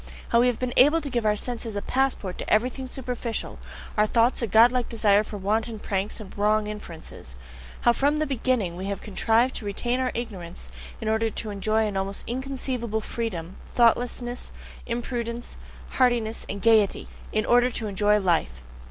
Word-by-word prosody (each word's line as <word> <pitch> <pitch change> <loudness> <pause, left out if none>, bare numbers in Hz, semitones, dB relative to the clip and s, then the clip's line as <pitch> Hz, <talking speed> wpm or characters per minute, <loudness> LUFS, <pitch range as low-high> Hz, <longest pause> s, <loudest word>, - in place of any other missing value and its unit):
how 235 - +4
we 245 - +5
have 245 -2 +1
been 250 -1 -2
able 295 +6 +6
to 285 -4 -6
give 240 -3 0
our 210 - +3
senses 230 -1 -3
a 205 - -1
passport 260 -8 0
to - - -5
everything 250 +4 +1
superficial, 245 -3 -4 0.4
our 210 0 +3
thoughts 235 +3 +2
a 235 - 0
godlike 235 +4 +5
desire 210 -2 +3
for 210 - -7
wanton 220 +3 -1
pranks 200 +1 -3
and 210 -3 -10
wrong 210 +1 +2
inferences! 170 - -8 0.5
how 240 - +5
from 285 +5 +2
the 310 - +1
beginning, 250 - 0
we 185 +2 -5
have 200 0 -3
contrived 225 +5 +2
to - - -5
retain 240 +5 -1
our 255 -1 0
ignorance 190 -8 -6 0.3
in 220 - -5
order 220 +1 +2
to 215 0 -4
enjoy 215 +2 +1
an 205 -2 -3
almost 195 +1 -2
inconceivable 255 -3 -3
freedom, 190 -6 -4 0.2
thoughtlessness, 240 +1 +1 0.4
imprudence, 235 0 -4 0.3
heartiness, 240 -3 +1
and 200 - -5
gaiety 220 -3 +4 0.2
in 215 0 0
order 245 +1 +4
to 230 -2 -3
enjoy 210 +1 +2
life! 165 - 0
225 Hz, 170 wpm, -25 LUFS, 205-245 Hz, 0.5 s, able